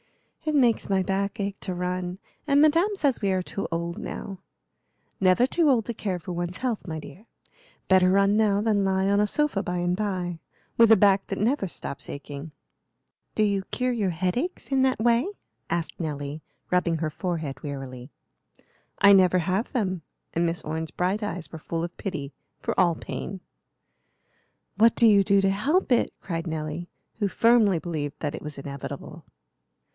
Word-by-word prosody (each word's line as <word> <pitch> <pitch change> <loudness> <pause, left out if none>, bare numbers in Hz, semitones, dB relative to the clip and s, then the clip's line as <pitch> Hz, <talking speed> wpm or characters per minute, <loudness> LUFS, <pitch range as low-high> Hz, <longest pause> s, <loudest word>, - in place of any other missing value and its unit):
"It 310 -1 0
makes 245 -7 +3
my 190 -1 +2
back 200 +3 -1
ache 200 0 -3
to 185 - -4
run, 180 0 -3 0.3
and 280 0 +4
Madame 330 +7 +4
says 285 -9 +1
we 200 -2 +1
are 185 -1 0
too 195 - -4
old 170 +1 -3
now." 195 -3 -6 0.8
"Never 185 +5 +4
too 310 +3 +2
old 235 -5 +3
to 235 - -3
care 200 -4 -2
for 175 +1 -7
one's 175 +1 -3
health, 240 -6 -2
my 160 -1 -4
dear. 180 +9 -12 0.6
Better 185 -1 +5
run 200 +2 +4
now 210 -2 +3
than 210 -2 +2
lie 190 0 +1
on 200 +1 +3
a 210 - +3
sofa 295 -4 0
by 180 -1 -3
and 175 0 0
by, 185 -4 -2 0.4
with 230 -1 +6
a - - +10
back 195 -1 +4
that 195 - -3
never 220 0 +1
stops 140 - -7
aching." 145 +2 -7 0.8
"Do 215 - +3
you 200 -2 +1
cure 255 0 -1
your 215 -6 0
headaches 185 - -2
in 270 -1 +3
that 260 -3 +2
way?" 235 +5 +3 0.4
asked 170 -1 -2
Nelly, 150 -2 -4 0.3
rubbing 180 -2 +2
her 155 -1 -2
forehead 155 -6 -4
wearily. 135 -3 -7 0.9
"I 200 +1 +7
never 185 -2 +5
have 185 +6 0
them;" 185 -7 -1 0.3
and 170 +1 +1
Miss 165 +1 -2
Orne's 160 0 -4
bright 185 +4 0
eyes 185 -5 -4
were 160 - -7
full 165 +1 -3
of 175 +1 -5
pity 145 -8 -5 0.3
for - - -3
all 175 -2 +4
pain. 190 +4 -6 1.4
"What 230 +1 +6
do 235 - +5
you 205 -3 +6
do 200 0 +4
to 195 0 +3
help 270 - +1
it?" 245 - +3
cried 165 -2 -4
Nelly, 160 +2 -4 0.3
who 205 - +2
firmly 225 -2 +4
believed 155 -4 -4
that 145 -1 -2
it - - -6
was 150 -2 -6
inevitable. 140 0 -7
190 Hz, 180 wpm, -26 LUFS, 170-215 Hz, 1.4 s, a